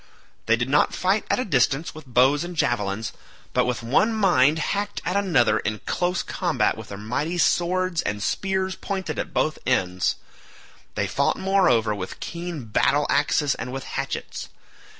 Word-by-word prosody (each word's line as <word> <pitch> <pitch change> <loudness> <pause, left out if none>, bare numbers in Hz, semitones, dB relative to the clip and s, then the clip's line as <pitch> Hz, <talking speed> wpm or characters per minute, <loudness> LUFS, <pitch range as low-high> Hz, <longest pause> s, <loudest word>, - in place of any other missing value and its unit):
They 110 - +5
did 120 +1 -2
not 145 +2 +2
fight 195 +3 +1
at - - +2
a 255 - -1
distance 135 -1 +1
with 155 -3 -12
bows 130 +5 +3
and 175 0 -6
javelins, 110 -6 -1 0.4
but - - +3
with 125 -1 -2
one 180 - +2
mind 160 -8 +4
hacked 205 +5 -2
at 180 - 0
one 200 0 +1
another 120 - +3
in 105 +1 -2
close 180 +1 0
combat 155 - 0
with 110 -1 -9
their 100 - -7
mighty 140 - -2
swords 180 0 +1
and 105 0 -3
spears 190 -1 -1
pointed 190 -5 -4
at - - -4
both 155 - 0
ends; 90 -8 +1 0.8
they - - 0
fought - - 0
moreover 185 - +3
with 95 -3 -6
keen 170 -6 -5
battle 140 +7 +2
axes 145 0 +2
and 125 - -6
with 135 0 -5
hatchets. - - -5
145 Hz, 170 wpm, -24 LUFS, 120-180 Hz, 0.8 s, They